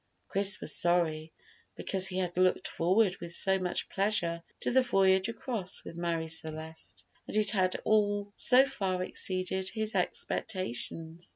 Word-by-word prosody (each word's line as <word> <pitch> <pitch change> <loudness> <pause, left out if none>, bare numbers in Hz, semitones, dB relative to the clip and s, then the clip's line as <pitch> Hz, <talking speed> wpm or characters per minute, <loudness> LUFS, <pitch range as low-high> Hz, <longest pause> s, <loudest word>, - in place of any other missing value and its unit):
Chris 195 0 +1
was - - -3
sorry, 165 -3 +1 0.4
because 190 -1 -1
he 185 - -4
had 180 -2 -1
looked 185 0 +2
forward 185 +3 +2
with 170 0 -6
so 190 +2 +2
much 180 -1 -1
pleasure 185 -4 0 0.2
to - - 0
the 260 +1 +5
voyage 190 -4 +3
across 225 -5 -3
with - - -9
Marie 170 -1 -2
Celeste, 160 - -5 0.2
and - - -1
it 210 -1 +3
had 185 -4 +1
all 205 -1 +1
so 255 +2 +5
far 190 -9 -2
exceeded 185 0 -1
his 220 -1 -2
expectations. 175 - -2
185 Hz, 150 wpm, -30 LUFS, 170-205 Hz, 0.4 s, the